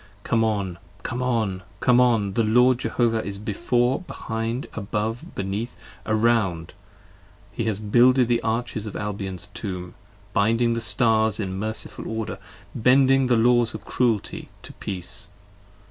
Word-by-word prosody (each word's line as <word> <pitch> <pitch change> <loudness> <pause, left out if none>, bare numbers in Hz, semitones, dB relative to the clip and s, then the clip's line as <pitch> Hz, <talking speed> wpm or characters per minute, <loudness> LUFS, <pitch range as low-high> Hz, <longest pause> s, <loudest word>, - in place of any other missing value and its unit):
Come 115 0 +2
on! 100 -5 -1 0.2
Come 125 - -3
on! 110 -7 0 0.2
Come 125 +1 +4
on! 110 -6 +2
The 115 - +2
Lord 125 +3 +4
Jehovah 115 -3 +1
is 100 0 -5
before, 120 - 0
behind, 115 -7 -4
above, 110 +2 -3
beneath, 100 +5 -3 0.3
around. 110 -7 +1 0.8
He 115 - -3
has 110 -3 0
builded 120 +4 +4
the 120 -1 +2
arches 110 -1 -2
of 100 - -7
Albion's 100 -2 -4
Tomb, 90 -4 -5 0.4
binding 115 +3 +2
the 115 - -2
Stars 110 -2 +2
55 105 - -2
In 95 - -4
merciful 110 +2 -4
Order, 110 -4 -4 0.3
bending 130 +2 +4
the 120 -2 +3
Laws 120 +1 +3
of - - -8
Cruelty 115 -5 -1
to - - -10
Peace. 90 -3 -6
110 Hz, 140 wpm, -24 LUFS, 100-120 Hz, 0.8 s, Come